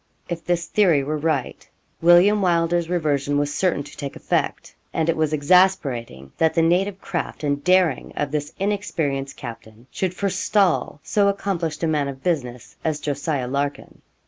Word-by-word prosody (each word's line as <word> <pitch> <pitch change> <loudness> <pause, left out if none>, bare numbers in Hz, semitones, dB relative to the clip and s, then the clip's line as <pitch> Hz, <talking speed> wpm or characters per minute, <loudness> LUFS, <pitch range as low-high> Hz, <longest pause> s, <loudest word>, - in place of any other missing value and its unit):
If 170 -2 -5
this 175 -1 0
theory 170 -10 +3
were 150 +2 -2
right, 150 -4 -2 0.3
William 175 +5 +6
Wylder's 170 -1 +1
reversion 145 -5 0
was 145 0 0
certain 180 -6 0
to - - -13
take 140 -2 -6
effect; - - -2 0.2
and 160 -1 -1
it 165 - +2
was 155 -1 0
exasperating 145 - +2
that 160 -1 +2
the 165 - +3
native 185 +4 +1
craft 175 -4 -4
and 145 -1 -1
daring 185 -2 +2
of 145 -1 -2
this 150 -1 -2
inexperienced 160 -9 -2
captain 115 -1 -10
should 185 -1 -2
forestall 195 -4 +1
so 205 -1 +2
accomplished 175 -6 -2
a - - +2
man 150 -3 +1
of 135 -1 -7
business 125 -9 -3
as 155 -2 -1
Jos. 145 0 -4
Larkin. 140 -1 -2
160 Hz, 160 wpm, -22 LUFS, 140-180 Hz, 0.3 s, William